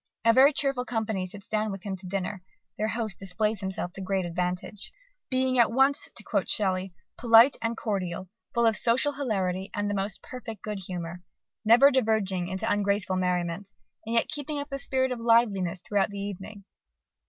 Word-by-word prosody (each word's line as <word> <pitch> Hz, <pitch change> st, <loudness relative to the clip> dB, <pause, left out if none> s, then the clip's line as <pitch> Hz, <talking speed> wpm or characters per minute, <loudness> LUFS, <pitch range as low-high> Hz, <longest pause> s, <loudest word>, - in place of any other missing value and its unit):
A 230 Hz, -, +6 dB
very 270 Hz, +4 st, +7 dB
cheerful 275 Hz, -3 st, +1 dB
company 220 Hz, -6 st, -2 dB
sits 200 Hz, +2 st, -10 dB
down 215 Hz, 0 st, -1 dB
with 195 Hz, -1 st, -7 dB
him 195 Hz, -2 st, -3 dB
to 185 Hz, 0 st, -9 dB
dinner: 190 Hz, +1 st, -3 dB, 0.3 s
their 215 Hz, -, -1 dB
host 220 Hz, -4 st, -3 dB
displays 210 Hz, +3 st, -1 dB
himself 190 Hz, -2 st, -3 dB
to 195 Hz, -, -7 dB
great 190 Hz, -1 st, -1 dB
advantage, 180 Hz, +4 st, -3 dB, 0.4 s
"being 255 Hz, -1 st, +1 dB
at 230 Hz, -1 st, +5 dB
once," 270 Hz, +3 st, +3 dB
to -, -, -11 dB
quote -, -, -1 dB
Shelley, 190 Hz, -2 st, +1 dB, 0.3 s
"polite 235 Hz, +3 st, +7 dB
and 230 Hz, 0 st, -2 dB
cordial, 185 Hz, -5 st, -3 dB, 0.2 s
full 235 Hz, 0 st, +2 dB
of 225 Hz, -1 st, +4 dB
social 245 Hz, +6 st, +4 dB
hilarity 195 Hz, -8 st, -2 dB
and 205 Hz, 0 st, -1 dB
the -, -, -1 dB
most 195 Hz, 0 st, -3 dB
perfect 230 Hz, -5 st, -8 dB
good 210 Hz, -2 st, -4 dB
humour, 175 Hz, -1 st, -6 dB, 0.4 s
never 240 Hz, +6 st, +7 dB
diverging 215 Hz, -8 st, +1 dB
into 190 Hz, +4 st, -3 dB
ungraceful 200 Hz, -2 st, +1 dB
merriment, 180 Hz, +1 st, -1 dB, 0.3 s
and 225 Hz, +1 st, -3 dB
yet 230 Hz, -, +2 dB
keeping 295 Hz, 0 st, -4 dB
up 285 Hz, 0 st, -4 dB
the 275 Hz, -, -3 dB
spirit 260 Hz, -1 st, 0 dB
of 250 Hz, -, -3 dB
liveliness 225 Hz, -7 st, +2 dB
throughout 205 Hz, -2 st, +1 dB
the 200 Hz, -, -8 dB
evening." 200 Hz, +1 st, -7 dB
210 Hz, 180 wpm, -27 LUFS, 190-235 Hz, 0.4 s, very